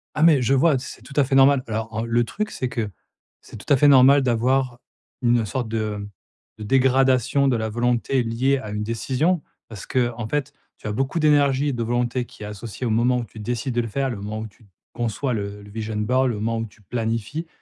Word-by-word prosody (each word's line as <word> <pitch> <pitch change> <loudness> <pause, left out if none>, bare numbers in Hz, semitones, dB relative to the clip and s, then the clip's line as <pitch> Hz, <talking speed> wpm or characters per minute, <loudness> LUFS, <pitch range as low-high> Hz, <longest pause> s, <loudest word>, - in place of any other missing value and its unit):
Ah 150 - -1
mais 160 -5 +6
je 135 - +2
vois, 145 +1 +4
c'est 130 - -8
tout 130 +4 -13
à 145 - +4
fait 135 +1 -3
normal. 135 0 +5
Alors, 110 0 -3
en 110 +1 -3
le 120 +1 +2
truc 215 - -4
c'est 130 - -3
que, 110 -4 -3 0.5
c'est - - -12
tout 110 - -8
à - - +5
fait 145 - +5
normal 135 +1 +7
d'avoir 125 +1 +1 0.4
une 120 -1 +3
sorte 120 +2 -3
de, 110 -2 -2
mmh, 100 0 -6 0.5
de - - -6
dégradation 130 +2 +3
de 125 -3 +2
la 110 0 -2
volonté 120 +3 0
liée 130 +4 +1
à 110 - -7
une 105 0 -3
décision 135 +9 0 0.3
parce 110 -4 -9
que, 120 -2 +1
en 115 -2 -5
fait, 145 +1 -2 0.2
tu - - -8
as - - -1
beaucoup 135 +9 -1
d'énergie 145 -2 +3
et 140 - -2
de 120 -1 -2
volonté 120 +1 -1
qui 105 - -13
est - - -5
associée 105 +4 -6
au 115 - 0
moment 120 +3 +2
où 120 - -4
tu 110 - -13
décides 120 +4 -3
de 120 - +1
le 115 - -4
faire, 135 +5 -1
le 110 - -5
moment 105 +2 -5
où 110 - -5
tu 105 0 -22 0.3
conçois 120 +3 -2
le 100 -1 -5
le 100 - -13
vision 110 0 -4
board, 125 +5 +2
le 120 - -2
moment 115 +1 -1
où 115 - -3
tu 105 - -22
planifies. 115 - -3
120 Hz, 240 wpm, -23 LUFS, 110-135 Hz, 0.5 s, normal